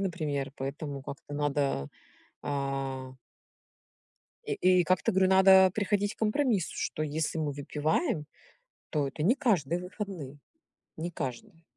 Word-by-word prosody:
например, 150 -7 -2
поэтому 140 +1 -5
как-то 145 +1 -8
надо, 140 - 0 0.6
э" - - -6 2.0
и - - -1 0.3
и - - +2
как-то 185 +5 +2
говорю: 190 0 +3
"Надо 190 0 +7
приходить 205 0 0
к - - -44
компромиссу, 220 - +1
что 155 - -2
если 155 +2 -1
мы 150 -2 -1
выпиваем, 150 - -1 0.6
то 145 -3 0
это 145 +3 -4
не 230 +9 +4
каждые 180 - +1
выходные". 180 -7 -6 0.6
Не 170 +2 -3
каждые. 165 - -6
160 Hz, 120 wpm, -29 LUFS, 145-190 Hz, 2.0 s, Надо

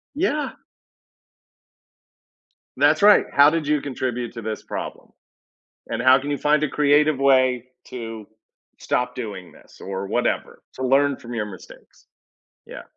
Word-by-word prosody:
Yeah. 300 -4 -1 2.3
That's - - +3
right. 205 0 +6
How 145 +1 +6
did 160 -2 -2
you 150 -2 +1
contribute 125 -3 -4
to 115 - -7
this 110 0 -5
problem? - - -7 0.8
and - - -3
how 130 +1 +5
can 145 +2 -5
you 145 - -1
find 150 0 +2
a 155 - +1
creative 150 0 +3
way 130 -3 +3 0.2
to 115 -3 -8 0.5
stop 125 0 -2
doing 100 -7 -7
this - - -20
or 95 0 -5
whatever, - - -2
to 130 - -5
learn 140 +1 +3
from 120 0 -9
your 110 -2 -2
mistakes. 95 -4 -14 0.6
Yeah, - - -10
130 Hz, 140 wpm, -22 LUFS, 115-145 Hz, 2.3 s, right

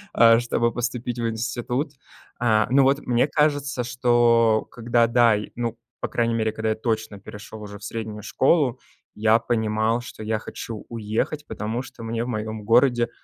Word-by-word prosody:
э, 115 0 +7
чтобы 120 -1 0
поступить 120 0 -3
в 115 - 0
институт. 120 +5 -2 0.5
Э, 110 -3 +3
ну, 135 +2 +5
вот, 140 +2 +3
мне 125 +2 +2
кажется, 145 -4 +1
что 120 -2 +3
когда 115 0 +2
да, 115 -2 +4
и, 105 - -5
ну, 115 -1 -3 0.2
по - - -2
крайней 115 -1 0
мере, 110 -1 0
когда 110 0 -2
я 110 - +1
точно 110 -2 -3
перешёл 105 +2 -10
уже 100 -1 -9
в - - -16
среднюю 110 -2 -5
школу, 135 -3 +2 0.4
я 110 +1 +4
понимал, 110 0 0
что 115 -2 -9
я 110 0 -1
хочу 110 0 -7
уехать, 115 +6 -3
потому 110 +3 -3
что 120 -3 -11
мне 115 +1 -2
в - - -5
моём 110 -2 -4
городе 120 +2 +3
115 Hz, 170 wpm, -24 LUFS, 110-120 Hz, 0.5 s, э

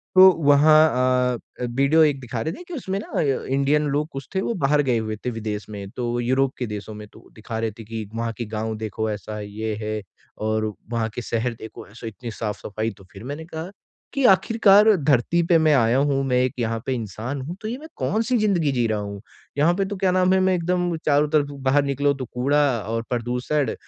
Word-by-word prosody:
तो 190 0 +10
वहाँ 140 -4 +4
अ, 125 - -8
वीडियो 140 +6 +4
एक 145 -3 +2
दिखा 120 -3 -5
रहे 160 - -2
थे - - -10
कि 355 - -8
उसमें 195 - -3
ना - - -8
अ, - - +2 0.3
इंडियन 140 +2 +2
लोग 150 +1 0
कुछ 135 0 -7
थे 190 - +2
वो 235 - -1
बाहर 145 +1 +3
गए 125 -4 +1
हुए 110 -1 -3
थे - - +1
विदेश 110 -2 -4
में, 100 -2 -7
तो 120 +2 -3
यूरोप 130 +2 +1
के 125 - -3
देशों 105 0 -6
में 105 0 -9
तो - - -17
दिखा 110 +1 -5
रहे 115 -1 -1
थे - - -7
कि 110 -1 -6
वहाँ 115 0 -2
के 120 - -3
गाँव 110 +1 -2
देखो 110 0 -3
ऐसा 105 +1 -6
ये 105 +1 -4
है 110 0 -3 0.5
और 110 0 0 0.2
वहाँ 115 -1 0
के - - -3
शहर 120 +1 -2
देखो 110 - -10
ऐसा 115 +3 -10
इतनी 110 +2 -7
साफ-सफाई, 110 0 -4
तो 95 - -16
फिर 100 +1 -11
मैंने 145 +5 -6
कहा 160 +1 -6 0.4
कि 275 - 0
आखिरकार 205 +1 +5
धरती 145 +1 +2
पे 170 - +5
मैं 155 -1 +4
आया 115 -1 +3
हूँ, 140 0 +2
मैं 125 -2 +1
एक 130 - -1
यहाँ 115 -1 -1
पे 130 - -1
इंसान 115 +4 -4
हूँ, 160 +7 -6
तो 215 - -5
ये 240 - -3
मैं 310 +3 -11
कौन-सी 230 +4 0
ज़िंदगी 185 -9 +2
जी 120 -3 +1
रहा 110 -1 -1
हूँ? 100 -1 -6 0.4
यहाँ 155 +4 +4
पे 195 +1 0
तो 205 +1 -4
क्या 185 -1 +2
नाम 185 0 +3
है, 190 - +4
मैं 185 0 +3
एकदम 175 0 0
चारों 145 0 +3
तरफ 150 -2 +2 0.2
बाहर 140 +2 +4
निकलो 140 +1 +1
तो - - -2
कूड़ा 140 +4 +2 0.3
और 115 0 -1
प्रदूषण 125 +3 -1
130 Hz, 225 wpm, -23 LUFS, 110-155 Hz, 0.5 s, तो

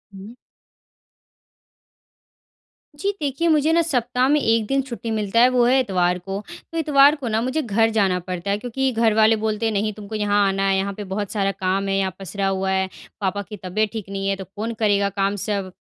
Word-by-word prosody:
हुँ। 200 +5 -10 2.6
जी, 395 +8 -1
देखिए 290 +3 -1
मुझे 310 -1 +3
ना 335 - +4
सप्ताह 250 -4 0
में 300 +1 +4
1 225 -2 +2
दिन 275 +2 +1
छुट्टी 235 -3 -6
मिलता 215 0 0
है 250 +2 +7
वो 250 -1 +3
है 255 +2 +4
इतवार 180 -6 +1
को। 195 +2 -5 0.3
तो 330 - -5
इतवार 290 -2 +5
को 280 -5 -6
ना 220 0 0
मुझे 260 +6 -1
घर 225 -2 +2
जाना 185 -2 +2
पड़ता 180 +1 -4
है। 200 - +1
क्योंकि 250 +4 -1
घर 225 -2 +2
वाले 220 +1 +5
बोलते 220 0 -2
हैं 220 - 0
नहीं 210 +1 0
तुमको 210 +1 -8
यहाँ 205 -1 +2
आना 195 0 0
है, 195 - +2
यहाँ 195 +1 -1
पे 205 - -7
बहुत 195 +1 -4
सारा 195 -2 0
काम 195 +1 -1
है, 195 - 0
यहाँ 190 -2 0
पसरा 195 +1 -3
हुआ 190 0 -1
है, 190 0 +1 0.3
पापा 200 +1 -1
की 210 - -7
तबीयत 205 +4 -1
ठीक 215 -4 -6
नहीं 195 0 -3
है 195 - +1
तो 190 0 -8
कौन 225 +3 -3
करेगा 200 -2 +2
काम 200 +1 -1
सब। 200 -2 -3
210 Hz, 210 wpm, -22 LUFS, 195-240 Hz, 2.6 s, है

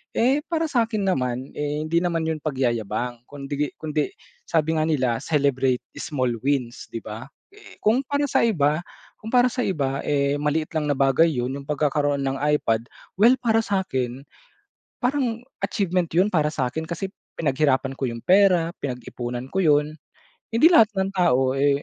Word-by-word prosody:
Eh 260 +5 +3
para 330 -1 0
sa 235 -4 +2
akin 215 -3 -2
naman, 130 -8 -1
eh, 150 +1 -2
hindi 165 +2 +1
naman 170 -2 -1
'yun 160 -1 -2
pagyayabang 120 -3 -2
kundi 145 0 -4
kundi 155 -2 -2 0.4
sabi 160 0 +1
nga 155 - +1
nila, 130 -7 +1
celebrate 135 -4 +1 0.2
small 130 -4 -1
wins, 130 -4 -1
'di 115 - -6
ba? 110 +4 -7 0.2
Eh, 415 +1 -16
kung 220 +4 +4
para 285 +1 0
sa - - +2
iba 155 -8 +2 0.4
kung 220 - -8
para 250 0 +5
sa 250 - -2
iba, 140 -7 -1
eh, 140 -1 +1
maliit 150 +1 -1
lang 155 -1 0
na 145 - +1
bagay 135 +4 +4
'yun 125 -5 -1
'yung 140 - -12
pagkakaroon 145 -1 0
ng 135 0 -2 0.2
iPad, 115 -4 0 0.3
well, 235 +5 +7
para 225 -2 +3
sa'kin, 135 - -2 0.8
parang 245 -3 0 0.2
achievement 180 -4 0
'yun 185 +4 +4
para 155 -4 +2
sa'kin, 160 +2 -2
kasi 170 +3 -3 0.3
pinaghirapan 140 -3 +1
ko 135 - -2
'yung 115 -1 -6
pera, 185 -3 +4
pinag-ipunan 125 -1 -5
ko 190 - -1
'yun 150 -2 +4 0.7
hindi 250 +9 +6
lahat 225 -10 +7
ng 190 0 0
tao, 135 -9 +2
eh 140 0 +2
150 Hz, 165 wpm, -23 LUFS, 135-185 Hz, 0.8 s, well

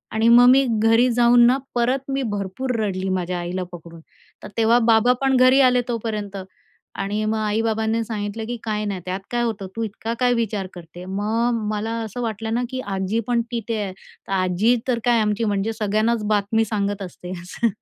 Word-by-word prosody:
आणि 220 +1 +2
मग 240 +1 +8
मी 270 +1 +5 0.2
घरी 225 +3 +4
जाऊन 240 0 +5
ना 255 +2 +4 0.2
परत 255 +3 0
मी 270 0 -1
भरपूर 205 +6 -3
रडली 190 -3 -2
माझ्या 180 -1 -2
आईला 175 +2 -3
पकडून. 170 -1 -11 0.4
तर - - -6
तेव्हा 230 +1 +4
बाबा 225 +3 +5
पण 270 -1 +2
घरी 255 +2 +6
आले 250 -1 +4
तोपर्यंत 215 -4 -3 0.6
आणि 205 +2 -2
मग 220 +1 0
आई-बाबांनी 220 +1 0
सांगितलं 220 0 -4
की 240 - -3
"काय 215 -1 -2
नाही. 195 -3 -3
त्यात 185 +1 -3
काय 240 0 0
होतं? 205 -5 -3
तू 230 - -2
इतका 220 +1 -4
काय 250 -1 +3
विचार 215 -5 -2
करते?" 175 0 -11
मग 225 +5 0
मला 215 +1 -2
असं 220 +3 -6
वाटलं 225 -1 -3
ना 240 +2 0
की 260 0 -4 0.2
आजी 190 +4 -1
पण 240 -1 +2
तिथे 230 -1 -3
आहे, 190 -2 -5
तर 190 - -17
आजी 190 +5 +2
तर 240 -2 +1
काय 240 -1 +4
आमची 210 +1 0
म्हणजे 205 +1 -1
सगळ्यांनाच 215 +1 0
बातमी 215 +1 +1
सांगत 205 -1 -2
असते 180 -1 -8
असं. 180 +6 -1
220 Hz, 190 wpm, -22 LUFS, 200-235 Hz, 0.6 s, मग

